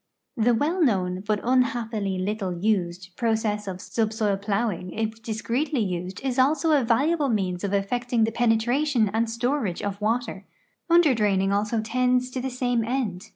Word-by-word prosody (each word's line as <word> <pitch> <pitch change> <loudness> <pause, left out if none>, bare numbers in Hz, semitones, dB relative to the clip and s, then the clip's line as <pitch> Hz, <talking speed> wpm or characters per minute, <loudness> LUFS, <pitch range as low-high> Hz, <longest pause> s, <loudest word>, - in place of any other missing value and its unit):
The 235 +1 +3
well 320 +10 0
known, 185 -7 +1
but 210 -1 +1
unhappily 230 -5 0
little 190 0 -2
used, 180 -2 -1
])rocess 220 -3 0
of 185 -1 -5
subsoil 215 -1 -1
plowing 200 -2 -2
if 220 0 -3
discreetly 235 +6 -1
used 180 -1 -4
is 265 -1 -1
also 290 +4 +3
a 290 -4 +4
valuable 280 +6 +2
means 185 -5 -1
of 200 - -1
effecting 235 +4 0
the 225 - +1
penetration 240 +2 +2
and 225 +1 +1
storage 235 -4 -1
of 200 0 -4
water; 220 -2 -1 0.5
underdraining 215 - +3
also 210 +2 0
tends 250 +2 +1
to 255 - -3
the 265 - -2
same 245 -2 0
end. 225 -5 -3
225 Hz, 155 wpm, -25 LUFS, 200-250 Hz, 0.5 s, a